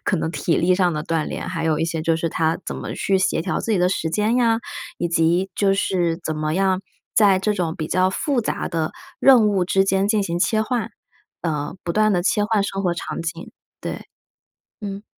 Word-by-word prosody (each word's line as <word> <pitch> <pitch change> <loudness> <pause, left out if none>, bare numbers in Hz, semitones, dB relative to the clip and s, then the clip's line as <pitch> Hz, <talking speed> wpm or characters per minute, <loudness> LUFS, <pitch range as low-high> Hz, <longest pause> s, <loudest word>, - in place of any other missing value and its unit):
可 185 - +1
能 160 - -1
体 170 - 0
力 180 +2 +3
上 180 -2 +2
的 150 +1 -3
锻 165 -2 -1
炼， - - -5
还 165 -3 -3
有 155 -2 +1
一 165 - +1
些 165 -1 -2
就 165 +1 +1
是 165 0 -2
他 160 0 0
怎 - - -4
么 - - -5
去 195 -1 +1
协 185 -3 +1
调 185 - -1
自 225 - -1
己 - - +3
的 180 +1 +3
时 165 - -1
间 210 +7 +1
呀， 230 -2 +3 0.4
以 175 - -1
及 170 +3 +2
就 195 -1 +2
是 175 -4 0
怎 155 - -1
么 155 +1 -2
样 190 0 +2 0.3
在 200 -3 +5
这 210 +3 0
种 175 -5 -2
比 155 - -3
较 185 +2 +2
复 255 +6 0
杂 - - -2
的 160 -1 -1 0.3
任 250 -5 +7
务 190 -4 +1
之 195 +1 +3
间 195 +1 +2
进 215 -2 +2
行 170 -2 -2
切 215 +4 +2
换， 235 -1 -2 0.5
呃， 150 -1 -2
不 170 - -2
断 215 -1 +3
地 175 -1 +1
切 205 +2 +2
换 210 -1 +1
生 195 -1 -3
活 175 -2 +1
场 - - -5
景。 165 +1 -5 0.3
对， - - -6 0.7
嗯。 200 0 -6
185 Hz, 240 characters per minute, -22 LUFS, 165-205 Hz, 0.7 s, 任